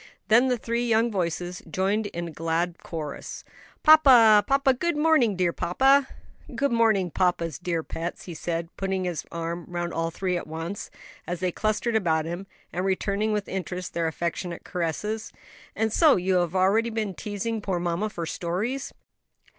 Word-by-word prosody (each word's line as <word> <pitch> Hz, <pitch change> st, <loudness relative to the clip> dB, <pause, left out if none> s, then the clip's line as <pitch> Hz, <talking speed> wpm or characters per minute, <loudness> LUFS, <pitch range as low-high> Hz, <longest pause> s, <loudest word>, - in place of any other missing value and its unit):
Then 235 Hz, +4 st, +6 dB
the 250 Hz, -1 st, +1 dB
three 235 Hz, +1 st, -2 dB
young 230 Hz, +1 st, +3 dB
voices 180 Hz, -1 st, -2 dB
joined 200 Hz, +5 st, 0 dB
in 170 Hz, -3 st, -5 dB
a -, -, -7 dB
glad 165 Hz, +2 st, -1 dB
chorus, 155 Hz, -4 st, -6 dB, 0.4 s
"Papa! 250 Hz, -9 st, +8 dB
papa! 275 Hz, -1 st, +3 dB
good 340 Hz, +5 st, -1 dB
morning, 295 Hz, -9 st, +3 dB
dear 180 Hz, -2 st, +1 dB
papa." 270 Hz, +9 st, +3 dB, 0.5 s
"Good 280 Hz, -1 st, +1 dB
morning, 220 Hz, -6 st, +2 dB
papa's 170 Hz, -5 st, 0 dB
dear 170 Hz, -2 st, -2 dB
pets," 170 Hz, +2 st, -5 dB
he 175 Hz, -, -7 dB
said, 165 Hz, +1 st, -4 dB
putting 190 Hz, -1 st, -1 dB
his 175 Hz, -3 st, -3 dB
arms 170 Hz, +1 st, -4 dB
round 175 Hz, 0 st, -3 dB
all 165 Hz, 0 st, -1 dB
three 180 Hz, +2 st, -2 dB
at 175 Hz, -, -6 dB
once, 165 Hz, +5 st, -5 dB, 0.4 s
as 175 Hz, -1 st, -3 dB
they 185 Hz, 0 st, 0 dB
clustered 215 Hz, +4 st, -1 dB
about 160 Hz, -7 st, +1 dB
him, 175 Hz, +4 st, -5 dB, 0.3 s
and 180 Hz, -, -2 dB
returning 200 Hz, +3 st, 0 dB
with 210 Hz, -1 st, -1 dB
interest 180 Hz, -1 st, -4 dB
their 170 Hz, -1 st, 0 dB
affectionate 170 Hz, +2 st, -3 dB
caresses. 210 Hz, +6 st, -3 dB, 0.4 s
"And 220 Hz, -1 st, 0 dB
so 315 Hz, -3 st, +6 dB
you 185 Hz, +1 st, +1 dB
have 175 Hz, 0 st, 0 dB
already 200 Hz, +5 st, +3 dB
been 220 Hz, -3 st, -2 dB
teasing 215 Hz, +3 st, -4 dB
poor 190 Hz, -3 st, -1 dB
mamma 175 Hz, +5 st, -1 dB
for 170 Hz, -5 st, -5 dB
stories?" 195 Hz, +12 st, -3 dB
185 Hz, 165 wpm, -26 LUFS, 170-220 Hz, 0.5 s, Papa